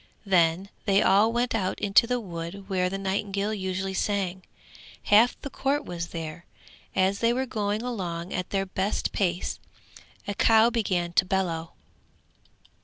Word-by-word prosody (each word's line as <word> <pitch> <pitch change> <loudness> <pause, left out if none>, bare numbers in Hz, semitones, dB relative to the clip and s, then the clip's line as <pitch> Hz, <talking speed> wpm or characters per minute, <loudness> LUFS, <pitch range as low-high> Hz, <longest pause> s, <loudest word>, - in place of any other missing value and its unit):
Then 180 0 +2 0.2
they 195 0 +4
all 205 +4 +4
went 240 +1 0
out 190 -4 -1
into 205 +3 +4
the 250 0 0
wood 180 -1 -7
where 185 -2 0
the 195 - -3
nightingale 200 +1 -1
usually 190 -1 -3
sang. 190 -2 -1 0.6
Half 220 +4 +4
the 280 - -6
court 285 +2 -1
was 170 -1 -4
there. 165 0 -7 0.5
As 190 +1 +2
they 230 0 +3
were 260 +2 0
going 210 -2 -2
along 180 -8 -4
at 180 -1 -3
their 195 -1 0
best 190 +2 -1
pace 180 -3 -1 0.7
a 205 - -1
cow 225 +3 +5
began 185 -7 -1
to 180 - +4
bellow. 175 -4 -2
195 Hz, 150 wpm, -26 LUFS, 180-215 Hz, 0.7 s, cow